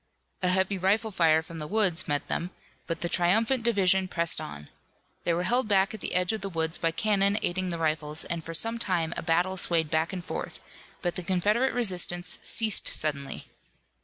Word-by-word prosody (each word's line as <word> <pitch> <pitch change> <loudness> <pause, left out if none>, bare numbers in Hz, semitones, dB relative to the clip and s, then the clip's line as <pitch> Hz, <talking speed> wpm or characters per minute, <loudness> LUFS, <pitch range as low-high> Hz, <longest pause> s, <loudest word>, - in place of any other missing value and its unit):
A 180 - +2
heavy 190 +1 +1
rifle 210 +4 +1
fire 160 -4 +3
from 165 0 -9
the 150 - -4
woods 195 -3 0
met 145 -2 -1
them, 175 - -2 0.4
but 165 - -3
the 175 - 0
triumphant 220 +9 +2
division 190 -5 +2
pressed 170 -2 +1
on. 75 0 -8 0.6
They 170 - +2
were 175 - -1
held 245 +5 +1
back 195 0 +2
at 215 - -8
the - - -2
edge 180 +2 +2
of 220 - -4
the 195 - -4
woods 165 -1 -2
by 165 - +1
cannon 200 +4 +1
aiding 185 +1 -1
the 170 - -3
rifles, 155 -1 -1
and 170 -1 -4
for 165 +1 -6
some 225 +6 +2
time 170 -6 0
a - - -4
battle 175 +3 0
swayed 165 -3 +1
back 160 +1 +1
and 180 -2 -6
forth, - - -5 0.4
but 175 -1 0
the - - +1
Confederate 210 +8 +1
resistance 180 -6 0
ceased 220 -3 +3
suddenly. 140 -3 -2
180 Hz, 195 wpm, -27 LUFS, 165-200 Hz, 0.6 s, fire